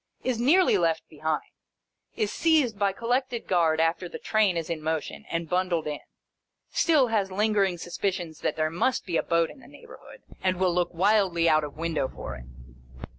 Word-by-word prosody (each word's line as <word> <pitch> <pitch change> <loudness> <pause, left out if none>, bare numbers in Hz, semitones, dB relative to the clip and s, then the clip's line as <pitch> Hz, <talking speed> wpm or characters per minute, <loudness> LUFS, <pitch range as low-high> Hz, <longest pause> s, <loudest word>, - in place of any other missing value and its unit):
Is 250 -3 -1
nearly 285 - +4
left 165 -2 0
behind. 155 0 -3 0.6
Is 215 -2 -1
seized 295 -11 +2
by 200 -1 +2
Collected 240 +3 -2
Guard 165 -3 +2
after 165 +2 0
the - - -7
Train 210 -5 +1
is 165 -1 -3
in 165 -2 -4
motion, 160 0 -3
and 165 0 -2
bundled 180 -2 0
in. 150 -1 -3 0.7
Still, 295 -7 +3
has 205 -4 0
lingering 200 -2 +1
suspicions 175 -2 -3
that - - -1
there 155 0 0
must 235 +10 0
be 170 -3 -1
a - - +2
boat 170 -1 +1
in - - -15
the - - -16
neighbourhood, 480 0 -14 0.2
and 185 -1 +1
will 185 -1 +2
look 175 0 0
wildly 185 -2 +2
out 155 -1 +4
of 145 0 -7
window 160 -4 -1
for - - -7
it. 65 -2 -11
180 Hz, 180 wpm, -26 LUFS, 165-215 Hz, 0.7 s, nearly